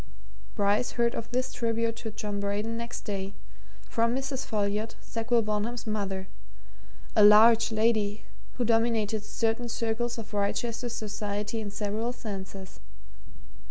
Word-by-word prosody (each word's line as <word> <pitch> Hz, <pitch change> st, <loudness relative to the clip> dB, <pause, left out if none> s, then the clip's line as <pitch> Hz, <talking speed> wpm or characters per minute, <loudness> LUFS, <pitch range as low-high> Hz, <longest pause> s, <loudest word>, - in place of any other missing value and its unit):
Bryce 205 Hz, +3 st, +2 dB
heard 235 Hz, -1 st, +2 dB
of 230 Hz, -, -5 dB
this 255 Hz, +1 st, -1 dB
tribute 230 Hz, 0 st, 0 dB
to 225 Hz, -, -5 dB
John 210 Hz, -1 st, -4 dB
Braden 205 Hz, +3 st, -1 dB
next 235 Hz, +1 st, -4 dB
day 200 Hz, -2 st, -4 dB, 0.5 s
from 230 Hz, +1 st, +1 dB
Mrs. 265 Hz, 0 st, -3 dB
Folliot, 210 Hz, +1 st, -1 dB
Sackville 230 Hz, 0 st, 0 dB
Bonham's 215 Hz, +2 st, -2 dB
mother, 195 Hz, -3 st, -2 dB, 0.9 s
a 215 Hz, -, +7 dB
large 225 Hz, +2 st, +8 dB
lady 215 Hz, -2 st, +1 dB, 0.3 s
who 245 Hz, -, -1 dB
dominated 225 Hz, -2 st, +2 dB
certain 225 Hz, +2 st, -1 dB
circles 235 Hz, +1 st, -1 dB
of 220 Hz, -1 st, -7 dB
Wrychester 230 Hz, +4 st, -1 dB
society 210 Hz, 0 st, -3 dB
in 210 Hz, -, -4 dB
several 210 Hz, +3 st, -2 dB
senses. 195 Hz, -4 st, -7 dB
220 Hz, 125 wpm, -28 LUFS, 205-230 Hz, 0.9 s, large